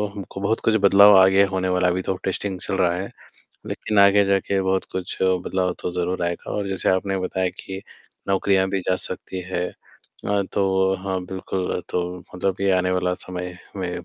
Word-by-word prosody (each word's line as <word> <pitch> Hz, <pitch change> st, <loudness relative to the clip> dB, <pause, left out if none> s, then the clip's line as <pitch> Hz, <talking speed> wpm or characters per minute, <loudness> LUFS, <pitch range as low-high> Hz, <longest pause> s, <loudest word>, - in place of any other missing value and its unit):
हमको 95 Hz, -1 st, -7 dB
बहुत 110 Hz, +3 st, +1 dB
कुछ 110 Hz, -, +3 dB
बदलाव 100 Hz, +1 st, +8 dB
आगे 95 Hz, +1 st, +6 dB
होने 95 Hz, 0 st, 0 dB
वाला 90 Hz, 0 st, +2 dB
है, -, -, +3 dB
अभी 95 Hz, -, -1 dB
तो 95 Hz, -, -2 dB
टेस्टिंग 95 Hz, 0 st, -2 dB
चल -, -, -3 dB
रहा 85 Hz, -1 st, +2 dB
है। 95 Hz, +2 st, -4 dB, 0.6 s
लेकिन 105 Hz, -1 st, -2 dB
आगे 100 Hz, 0 st, +6 dB
जाके 100 Hz, 0 st, +1 dB
बहुत 95 Hz, 0 st, 0 dB
कुछ 95 Hz, -1 st, -4 dB
बदलाव 95 Hz, 0 st, +1 dB
तो 90 Hz, -, -3 dB
ज़रूर 90 Hz, 0 st, -2 dB
आएगा 85 Hz, 0 st, -4 dB
और 100 Hz, -1 st, -2 dB
जैसे 95 Hz, -1 st, -1 dB
आपने 95 Hz, +1 st, 0 dB
बताया 95 Hz, 0 st, -1 dB
कि 95 Hz, 0 st, -7 dB, 0.5 s
नौकरियाँ 95 Hz, 0 st, +2 dB
भी 95 Hz, -, 0 dB
जा 90 Hz, -, +3 dB
सकती 95 Hz, 0 st, -5 dB
हैं। 90 Hz, -1 st, -1 dB
अ, 100 Hz, -1 st, -5 dB
तो 95 Hz, -1 st, +2 dB
हाँ, 95 Hz, -1 st, -2 dB
बिल्कुल 95 Hz, -1 st, -3 dB
तो 90 Hz, -, 0 dB, 0.3 s
मतलब 95 Hz, +1 st, -1 dB
कि 100 Hz, 0 st, +1 dB
आने 90 Hz, 0 st, +2 dB
वाला 90 Hz, 0 st, 0 dB
समय 90 Hz, 0 st, -6 dB, 0.2 s
में 90 Hz, -2 st, -3 dB
95 Hz, 190 wpm, -23 LUFS, 90-95 Hz, 0.6 s, बदलाव